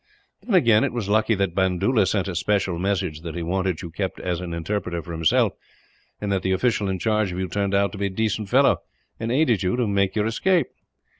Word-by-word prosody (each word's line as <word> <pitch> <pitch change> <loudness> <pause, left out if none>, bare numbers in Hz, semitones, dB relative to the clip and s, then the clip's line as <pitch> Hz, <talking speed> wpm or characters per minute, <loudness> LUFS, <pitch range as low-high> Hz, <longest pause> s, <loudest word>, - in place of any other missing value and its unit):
Then 210 0 -1
again, 115 -10 +5
it - - -1
was 115 -5 -3
lucky 110 +1 +3
that 95 -3 -1
Bandoola 95 +4 +2
sent 100 0 0
a 95 - -3
special 95 -1 0
message 95 -5 -1
that 85 -1 -6
he 85 - -3
wanted 95 0 -1
you 85 - -7
kept 95 +2 -4
as 90 -1 -2
an 90 -1 -5
interpreter 85 +1 -3
for 85 - -9
himself, 80 -1 +2 0.7
and 105 -1 -3
that 95 -1 +1
the 95 +1 0
official 105 0 +1
in 95 - -1
charge 105 -1 0
of 90 - -5
you 95 0 -2
turned 100 +2 -1
out 100 +1 +2
a 100 - +1
decent 105 +1 -2
fellow, - - +4 0.4
and 115 +1 -2
aided 125 - +2
you 90 +2 0
to 125 -1 +1
make 100 -2 0
your 105 -1 +1
escape. 170 +11 +1
100 Hz, 220 wpm, -23 LUFS, 90-110 Hz, 0.7 s, again